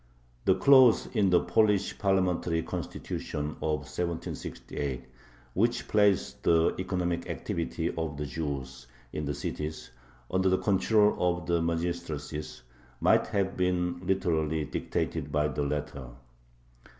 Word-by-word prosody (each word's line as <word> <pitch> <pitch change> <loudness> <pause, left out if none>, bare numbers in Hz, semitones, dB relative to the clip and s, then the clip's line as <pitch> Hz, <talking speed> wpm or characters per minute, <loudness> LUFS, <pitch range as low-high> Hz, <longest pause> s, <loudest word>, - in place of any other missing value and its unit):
The 95 - +5
clause 130 +3 +6
in 100 -2 +4
the 90 -1 +5
Polish 105 -3 +2
parliamentary 90 -4 +1
Constitution 75 0 -4
of 75 -1 0
1768, 70 -5 -4 0.5
which 115 +5 +1
placed 105 -3 +2
the 80 -1 +3
economic 90 -2 -2
activity 85 0 -2
of 80 -3 -3
the 75 - -3
Jews 65 -3 -5 0.3
in 75 - -3
the 70 0 -2
cities 75 -3 -5 0.4
under 95 +1 +2
the 95 - +3
control 105 +2 +3
of 90 -1 0
the 85 -1 +1
magistracies, 80 -4 -3 0.4
might - - +4
have 100 -1 -1
been 90 -1 0
literally 80 -5 0
dictated - - -3
by 75 0 +2
the 75 - -3
latter. 70 -2 -3
85 Hz, 120 wpm, -29 LUFS, 75-95 Hz, 0.5 s, clause